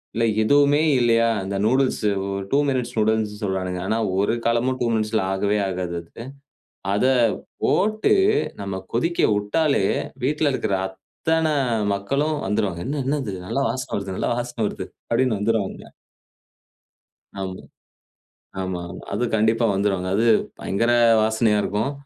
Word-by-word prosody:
இல்ல 115 +1 +2 0.2
எதுவுமே 145 +4 +4 0.2
இல்லையா, 115 -1 +3
அந்த 95 +1 -4
நூடில்ஸு 130 -2 +2 0.2
ஒரு 100 0 -3
2 140 - +4
மினிட்ஸ் 125 -2 -2
நூடில்ஸ்ன்னு 110 0 0
சொல்றானுங்க. 95 -2 -2
ஆனா 110 - +1 0.2
ஒரு 100 +3 +2
காலமும் 120 +3 +1
2 120 - +2
மினிட்ஸில 110 -1 0
ஆகவே 100 +2 +1
ஆகாது 90 -2 -3
அது. 115 +7 -11 0.7
அத 105 +5 +1 0.6
போட்டு, 215 - +2 0.5
நம்ம 100 -1 -4
கொதிக்க 165 +9 +1
உட்டாலே, 105 +2 +1 0.4
வீட்ல 150 +1 +1
இருக்கிற 110 -5 -1
அத்தனை 160 +11 -2 0.4
மக்களும் 140 +10 -1
வந்துருவாங்க. 95 -5 -1
"என்ன 145 +1 -2
என்னது? 135 -7 -1
நல்ல 135 - -1
வாசனை 125 +2 -4
வருது, 100 -1 -4
நல்ல - - -1
வாசனை 120 -1 -4
வருது" - - -6 0.2
அப்டின்னு 115 -3 +2
வந்துருவாங்க. 105 -1 -2 1.5
ஆமா. 95 -1 -4 1.1
ஆமா, 95 -1 -3
ஆமா. - - -9
அது - - 0
கண்டிப்பா 110 +2 +2
வந்துருவாங்க. 95 -2 0
அது 110 - +2 0.4
பயங்கர 115 +5 +1 0.3
வாசனையா 110 -1 +2
இருக்கும். 110 +8 -1
110 Hz, 130 wpm, -23 LUFS, 100-130 Hz, 1.5 s, எதுவுமே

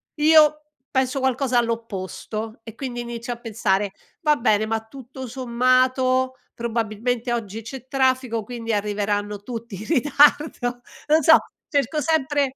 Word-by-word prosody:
io, 305 0 +5 0.3
penso 265 +1 +1
qualcosa 260 -1 +1
all'opposto, 225 -1 -4
e 225 -2 -10
quindi 245 -3 -4
inizio 235 0 -5
a 235 - -10
pensare: 205 -4 0 0.3
"Va 300 -2 +4
bene, 215 -2 +2
ma 225 0 -1
tutto 260 0 -9
sommato, 255 +1 +2 0.2
probabilmente 235 +1 -2
oggi 225 -2 -4
c'è 260 +2 -9
traffico, 260 -4 +1
quindi 230 0 -4
arriveranno 205 0 -1
tutti 230 -2 -6
in 205 +3 -8
ritardo" 290 -4 +3 0.3
non 310 +1 +4
so, 320 +3 +8 0.3
cerco 285 0 +1
sempre 290 -3 +1
245 Hz, 130 wpm, -23 LUFS, 225-265 Hz, 0.3 s, so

